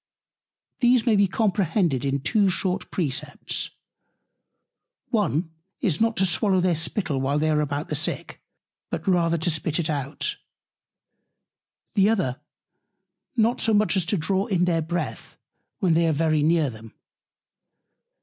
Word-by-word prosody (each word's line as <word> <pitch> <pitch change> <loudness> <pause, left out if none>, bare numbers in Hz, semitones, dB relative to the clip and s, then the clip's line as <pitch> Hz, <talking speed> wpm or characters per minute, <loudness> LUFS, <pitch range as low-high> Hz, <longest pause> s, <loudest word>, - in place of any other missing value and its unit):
These 245 -2 +4
may 230 -3 +4
be 200 -1 +4
comprehended 185 - +1
in 140 0 -1
two 205 - +2
short 185 0 -1
Precepts. 150 -8 -2 1.4
One 160 +6 0 0.3
is, 170 -2 0
not 225 0 +2
to 190 - +4
swallow 190 +1 +2
their 180 -1 +2
Spittle 160 -3 -2
while 140 +2 0
they 155 +1 +1
are 150 0 +2
about 145 +1 -3
the - - -1
Sick, - - -3 0.5
but - - -5
rather 170 -3 +2
to 160 +2 -1
spit 160 0 -1
it 160 -2 0
out: 145 - -3 1.6
The 200 0 +4
other, 175 - 0 1.0
not 230 +2 +2
so 220 -1 +3
much 210 0 +3
as 185 -4 +1
to 200 - +1
draw 190 +5 0
in 180 -5 +2
their 165 -2 +1
Breath, 170 +2 -4 0.4
when 180 -4 +3
they 165 +1 +3
are - - +3
very 155 0 +1
near 155 -2 +2
them. 110 0 -13
170 Hz, 145 wpm, -24 LUFS, 155-200 Hz, 1.6 s, These